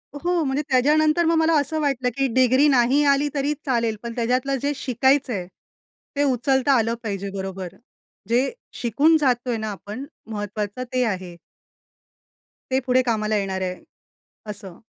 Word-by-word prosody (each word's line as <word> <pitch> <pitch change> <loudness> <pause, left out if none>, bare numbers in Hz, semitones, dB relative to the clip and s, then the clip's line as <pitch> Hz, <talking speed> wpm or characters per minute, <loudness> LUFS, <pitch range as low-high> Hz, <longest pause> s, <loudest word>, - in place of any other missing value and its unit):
हो, 345 +3 0
म्हणजे 275 +1 0
त्याच्यानंतर 305 +5 +3
मग 330 0 +3
मला 320 +1 +3
असं 300 +3 -2
वाटलं 260 -4 0
की 275 0 +2
डिग्री 260 +3 +4
नाही 265 +1 +3
आली 280 +1 +1
तरी 285 +1 0
चालेल 235 -5 0
पण 235 0 -5
त्याच्यातलं 250 +3 0
जे 285 +1 0
शिकायचं 265 0 +1
आहे, 180 -3 -4 0.7
ते 285 - +2
उचलता 265 +2 +2
आलं 230 0 +1
पाहिजे 200 -2 -3
बरोबर. 190 -2 -5 0.5
जे 245 +4 +2 0.2
शिकून 285 +7 +3
जात 265 -5 +3
आहे 235 - 0
ना 220 0 -4
आपण 210 +6 -7 0.3
महत्वाचं 210 +2 -4
ते 255 0 +2
आहे. 185 -5 -4 1.3
ते 260 - +3
पुढे 255 0 +3
कामाला 215 -3 0
येणार 190 -1 -2
आहे 185 -1 -2 0.8
असं. 190 -3 -11
250 Hz, 155 wpm, -23 LUFS, 215-280 Hz, 1.3 s, डिग्री